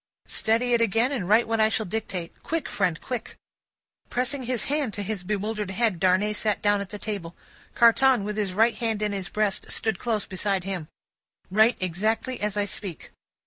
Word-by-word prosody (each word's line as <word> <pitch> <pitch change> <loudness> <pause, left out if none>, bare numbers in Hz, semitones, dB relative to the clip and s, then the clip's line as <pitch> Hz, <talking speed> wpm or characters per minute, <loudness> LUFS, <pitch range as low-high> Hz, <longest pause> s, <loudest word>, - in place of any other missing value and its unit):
"Steady 235 +3 +1
it 235 - +3
again, 230 +4 +2
and 210 -10 -2
write 225 +3 +5
what 225 0 0
I 220 0 +5
shall 220 0 0
dictate. 185 -4 -5
Quick, 325 -3 -2
friend, 180 -5 0
quick!" 250 -2 -5 0.7
Pressing 255 +3 -1
his 245 -1 0
hand 285 -6 -1
to 205 - -3
his 200 -2 -4
bewildered 210 +1 -2
head, 195 -2 0
Darnay 190 +3 +3
sat 210 0 0
down 205 -1 +2
at 200 - -6
the 210 - -6
table. 200 -5 -5 0.4
Carton, 240 0 +5
with 210 +1 -3
his 205 -3 -1
right 225 +3 +4
hand 225 -3 0
in 210 - 0
his 195 -2 -4
breast, 210 -2 -1
stood 220 -5 0
close 225 -3 -1
beside 190 0 -1
him. 185 -5 -4 0.6
"Write 220 +4 +4
exactly 215 +8 -1
as 210 0 -1
I 205 - +2
speak." 195 -3 -6
210 Hz, 185 wpm, -26 LUFS, 195-230 Hz, 0.7 s, write